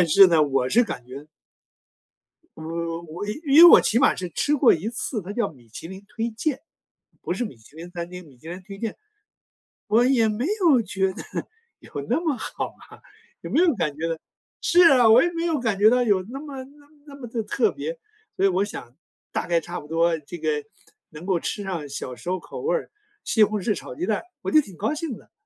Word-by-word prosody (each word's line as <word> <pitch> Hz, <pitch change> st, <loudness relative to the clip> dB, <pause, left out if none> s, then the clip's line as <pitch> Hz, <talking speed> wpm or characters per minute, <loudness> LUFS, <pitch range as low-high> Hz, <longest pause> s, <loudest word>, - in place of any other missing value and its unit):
但 175 Hz, -, +3 dB
是 195 Hz, +5 st, +8 dB
呢， 165 Hz, -3 st, +4 dB
我 135 Hz, -3 st, +1 dB
是 235 Hz, -, +4 dB
感 125 Hz, -, -6 dB
觉 140 Hz, +4 st, -10 dB, 1.3 s
我 165 Hz, +1 st, -4 dB
我 165 Hz, +4 st, -7 dB, 0.2 s
因 290 Hz, +4 st, +8 dB
为 -, -, +13 dB
我 -, -, +10 dB
起 230 Hz, -, +2 dB
码 265 Hz, -, +4 dB
是 185 Hz, -, -4 dB
吃 295 Hz, -, +1 dB
过 270 Hz, -3 st, +5 dB
一 185 Hz, +8 st, -2 dB
次， 235 Hz, -1 st, -3 dB
它 190 Hz, +2 st, -7 dB
叫 225 Hz, -1 st, 0 dB
米 120 Hz, -5 st, -21 dB
其 140 Hz, +8 st, -9 dB
林 190 Hz, +2 st, -10 dB
推 225 Hz, +2 st, -3 dB
荐， 265 Hz, +5 st, -2 dB, 0.6 s
不 -, -, -5 dB
是 245 Hz, -, -1 dB
米 210 Hz, -, -8 dB
其 115 Hz, +6 st, -21 dB
林 170 Hz, +2 st, -10 dB
餐 170 Hz, 0 st, -6 dB
厅， 180 Hz, -1 st, -9 dB
米 135 Hz, -, -18 dB
其 160 Hz, -, -10 dB
林 180 Hz, +2 st, -6 dB
推 195 Hz, +1 st, -10 dB
荐。 225 Hz, -2 st, -3 dB, 0.9 s
我 225 Hz, +4 st, +4 dB
也 250 Hz, -4 st, +3 dB
没 220 Hz, +6 st, -2 dB
有 315 Hz, -9 st, +5 dB
觉 190 Hz, -2 st, -1 dB
得 -, -, -8 dB, 0.6 s
有 -, -, -17 dB, 0.2 s
那 -, -, +1 dB
么 310 Hz, -7 st, -1 dB
好 -, -, -4 dB, 0.2 s
啊， -, -, -16 dB, 0.4 s
也 -, -, -7 dB
没 330 Hz, -, +3 dB
有 345 Hz, -5 st, +4 dB
感 160 Hz, -8 st, -2 dB
觉 165 Hz, +1 st, -2 dB
到 165 Hz, -, -1 dB, 0.5 s
是 350 Hz, +1 st, +4 dB
啊， 245 Hz, -4 st, +6 dB
我 235 Hz, +6 st, +7 dB
也 345 Hz, -, 0 dB
没 335 Hz, 0 st, -3 dB
有 320 Hz, -4 st, 0 dB
感 220 Hz, -5 st, -1 dB
觉 215 Hz, -, +7 dB
到 250 Hz, +1 st, +3 dB
有 205 Hz, -5 st, +2 dB
那 270 Hz, -, -6 dB
么 280 Hz, -3 st, -7 dB
那 290 Hz, +1 st, -20 dB
么 305 Hz, -, -26 dB
那 280 Hz, -, -11 dB
么 255 Hz, -4 st, -9 dB
的 230 Hz, 0 st, -3 dB
特 405 Hz, -, +1 dB
别。 -, -, -5 dB, 0.4 s
所 195 Hz, -, +2 dB
以 -, -, +5 dB
我 190 Hz, +1 st, +1 dB
想 125 Hz, -, -8 dB, 0.4 s
大 -, -, -3 dB
概 170 Hz, -1 st, +2 dB
差 175 Hz, +1 st, -6 dB
不 150 Hz, -, -13 dB
多 165 Hz, +1 st, +2 dB
这 155 Hz, +4 st, -9 dB
个 155 Hz, -2 st, -1 dB, 0.5 s
能 155 Hz, +3 st, -11 dB
够 185 Hz, -3 st, +1 dB
吃 205 Hz, -, -4 dB
上 170 Hz, -7 st, -4 dB
小 130 Hz, -2 st, -6 dB
时 120 Hz, +10 st, -7 dB
候 185 Hz, -, -1 dB
口 475 Hz, -, -9 dB
味 475 Hz, +3 st, +1 dB
儿， -, -, -4 dB, 0.3 s
西 220 Hz, -, +3 dB
红 210 Hz, 0 st, +1 dB
柿 210 Hz, +3 st, 0 dB
炒 -, -, -8 dB
鸡 350 Hz, -, -3 dB
蛋， -, -, 0 dB, 0.2 s
我 -, -, -2 dB
就 310 Hz, -, +6 dB
挺 195 Hz, -, -13 dB
高 220 Hz, +9 st, -1 dB
兴 305 Hz, -6 st, -4 dB
的。 -, -, -21 dB
200 Hz, 250 characters per minute, -24 LUFS, 165-260 Hz, 1.3 s, 为